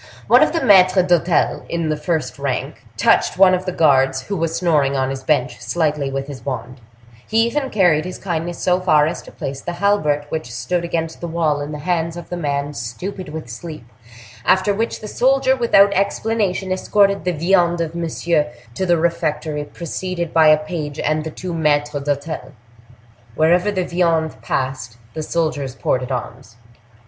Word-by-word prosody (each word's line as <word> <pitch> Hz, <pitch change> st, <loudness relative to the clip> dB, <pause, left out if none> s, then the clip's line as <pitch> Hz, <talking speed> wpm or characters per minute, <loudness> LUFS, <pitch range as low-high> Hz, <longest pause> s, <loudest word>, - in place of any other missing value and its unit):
One -, -, +6 dB
of -, -, +4 dB
the 330 Hz, -, -1 dB
maitres 185 Hz, -2 st, +5 dB
d'hotel, 175 Hz, -2 st, +2 dB
the 165 Hz, -2 st, -1 dB
first 155 Hz, -1 st, -2 dB
in -, -, -9 dB
rank, 135 Hz, -3 st, -3 dB
touched -, -, +3 dB
one 185 Hz, -1 st, +6 dB
of 185 Hz, 0 st, 0 dB
the -, -, 0 dB
guards, 135 Hz, -5 st, +3 dB
who 200 Hz, -, -4 dB
was 165 Hz, -2 st, -1 dB
snoring 150 Hz, -6 st, +2 dB
on 130 Hz, 0 st, 0 dB
his 135 Hz, -1 st, -5 dB
bench, 125 Hz, -4 st, 0 dB
slightly 150 Hz, +2 st, -1 dB
with 135 Hz, 0 st, -3 dB
his 140 Hz, -2 st, -9 dB
wand; 125 Hz, -1 st, -5 dB, 0.5 s
he 225 Hz, +1 st, +3 dB
even 270 Hz, +3 st, -1 dB
carried 175 Hz, -8 st, +3 dB
his 180 Hz, 0 st, -6 dB
kindness 175 Hz, -2 st, -3 dB
so 180 Hz, 0 st, +1 dB
far 155 Hz, -5 st, +4 dB
as 165 Hz, +3 st, -3 dB
to -, -, -14 dB
place 135 Hz, 0 st, -6 dB
the 175 Hz, -, -4 dB
halbert 165 Hz, -7 st, +1 dB
which 155 Hz, -7 st, -4 dB
stood 125 Hz, +10 st, -2 dB
against 165 Hz, -1 st, -3 dB
the 170 Hz, -, -3 dB
wall 160 Hz, -3 st, 0 dB
in 145 Hz, +1 st, -5 dB
the 150 Hz, -, -5 dB
hands 165 Hz, +1 st, -1 dB
of 175 Hz, -, -9 dB
the 175 Hz, -, -3 dB
man 145 Hz, -3 st, -2 dB
stupid 150 Hz, -, -6 dB
with 155 Hz, -3 st, -7 dB
sleep, 155 Hz, +4 st, -8 dB, 0.6 s
after 190 Hz, +9 st, +3 dB
which 225 Hz, +3 st, -2 dB
the 215 Hz, -, -6 dB
soldier, 265 Hz, +3 st, +2 dB
without 205 Hz, -5 st, +4 dB
explanation, 200 Hz, -1 st, 0 dB
escorted 200 Hz, +1 st, +2 dB
the 180 Hz, -, 0 dB
viande 175 Hz, +1 st, +2 dB
of 165 Hz, -1 st, -3 dB
Monsieur 170 Hz, -2 st, 0 dB, 0.3 s
to 190 Hz, +9 st, -2 dB
the 175 Hz, -1 st, +4 dB
refectory, 155 Hz, -2 st, -1 dB
preceded 170 Hz, +2 st, -5 dB
by 160 Hz, -1 st, +5 dB
a 155 Hz, 0 st, +7 dB
page 155 Hz, -2 st, -5 dB
and 155 Hz, +1 st, 0 dB
the 160 Hz, -, -4 dB
two 180 Hz, +3 st, -6 dB
maitres 145 Hz, -2 st, 0 dB
d'hotel. 145 Hz, +2 st, -3 dB, 0.8 s
Wherever 175 Hz, +6 st, +3 dB
the 185 Hz, -3 st, -1 dB
viande 165 Hz, -3 st, 0 dB
passed, 130 Hz, -4 st, -3 dB, 0.2 s
the 155 Hz, -, -4 dB
soldiers 150 Hz, -5 st, -2 dB
ported 130 Hz, +1 st, -1 dB
arms. 125 Hz, -1 st, -6 dB
160 Hz, 180 wpm, -20 LUFS, 145-180 Hz, 0.8 s, a